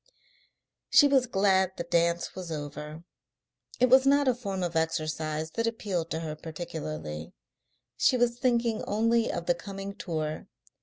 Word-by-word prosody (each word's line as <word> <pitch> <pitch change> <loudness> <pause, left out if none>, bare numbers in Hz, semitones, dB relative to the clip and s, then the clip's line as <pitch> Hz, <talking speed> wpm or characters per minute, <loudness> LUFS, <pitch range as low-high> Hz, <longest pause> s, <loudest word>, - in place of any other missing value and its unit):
She 290 - +7
was 265 -3 +3
glad 190 -3 +2
the - - -2
dance 170 0 +1
was 180 -3 -7
over; 150 +1 -6 0.8
it 250 - +5
was 260 +2 +6
not 285 0 +4
a 255 - +5
form 200 -6 -4
of 175 -2 -3
exercise 160 -1 -1
that 230 +5 -1
appealed 195 -7 -2
to 160 - -3
her 155 -2 -4
particularly. 155 - -6 0.6
She 255 - +3
was 240 0 +1
thinking 235 -3 +1
only 230 +2 +2
of 170 - -4
the 175 - +3
coming 195 +2 -7
tour. 155 -5 -4
180 Hz, 150 wpm, -28 LUFS, 160-230 Hz, 0.8 s, She